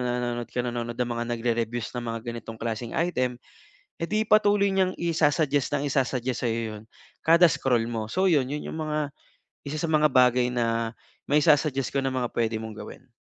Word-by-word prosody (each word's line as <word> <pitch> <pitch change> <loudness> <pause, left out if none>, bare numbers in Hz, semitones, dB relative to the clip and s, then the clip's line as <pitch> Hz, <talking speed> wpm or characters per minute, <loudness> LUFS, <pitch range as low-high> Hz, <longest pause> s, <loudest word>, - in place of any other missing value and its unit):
nanonood 120 -1 -2
ka, 125 - 0
nanonood 120 -1 -3
ka 125 - 0
ng 120 - -6
mga 120 - -2
nagrerere-reviews 115 0 -2
ng 120 - -3
mga 115 0 -3
ganitong 115 -1 -8
klaseng 115 0 -3
item, 130 -8 0 0.6
eh, 165 - -2
'di 215 +1 +1
patuloy 205 -1 +4
niyang 190 -1 +2
isa-suggest 150 -4 +1
ng - - -3
isa-suggest 130 -3 -1
sa'yo 115 0 0 0.2
yun 105 - -11 0.4
kada 170 +2 +7
scroll 125 -5 +1
mo. 115 -2 -3
So 190 +1 +1
yun, 135 -5 +2
yun 150 - -4
yung - - -5
mga 150 -2 -2 0.6
isa 150 +2 -3
sa 165 - -1
mga 150 -1 +4
bagay 125 -1 +4
na 115 -1 0 0.4
maisa-suggest 145 -3 +3
ko 140 - +1
na 135 -1 -1
mga 125 -2 -1
puwede 115 -1 0
mong 110 -1 -7
gawin. 130 - -10
125 Hz, 185 wpm, -26 LUFS, 120-150 Hz, 0.6 s, kada